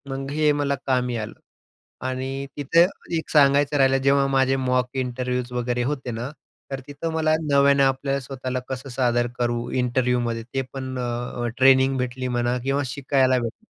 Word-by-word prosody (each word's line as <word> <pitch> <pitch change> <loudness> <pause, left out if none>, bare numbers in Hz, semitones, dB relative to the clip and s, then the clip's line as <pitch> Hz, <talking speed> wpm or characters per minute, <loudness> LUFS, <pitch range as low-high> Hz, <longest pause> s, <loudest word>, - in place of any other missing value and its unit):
मग 135 +1 -5
हे 150 0 +3
मला 145 -1 0
कामी 125 -2 +1
आलं 110 -1 -6 0.7
आणि 130 +1 -3
तिथं 165 +5 +4 0.3
एक 160 - -5
सांगायचं 145 0 +4
राहिलं 135 -1 +4
जेव्हा 140 0 +4
माझे 135 0 +2
मॉक 125 -1 +1
इंटरव्ह्यूज 125 -1 -2
वगैरे 125 0 -1
होते 135 -2 -3
ना 115 +3 -4 0.4
तर 135 - -3
तिथं 145 +3 -4
मला 155 -1 +2 0.2
नव्यानं 140 0 +5
आपल्याला 135 +1 +1
स्वतःला 130 -1 -4
कसं 130 +1 -5
सादर 120 -1 +1
करू 120 0 -1
इंटरव्ह्यूमध्ये. 125 -2 0
ते 135 +3 -3
पण 130 -1 -5
अ, 120 0 -3
ट्रेनिंग 130 0 +5
भेटली 125 0 -3
म्हणा 120 0 0
किंवा 135 +2 0
शिकायला 130 -1 +2
भेटलं. 115 -2 -6
130 Hz, 155 wpm, -23 LUFS, 125-140 Hz, 0.7 s, नव्यानं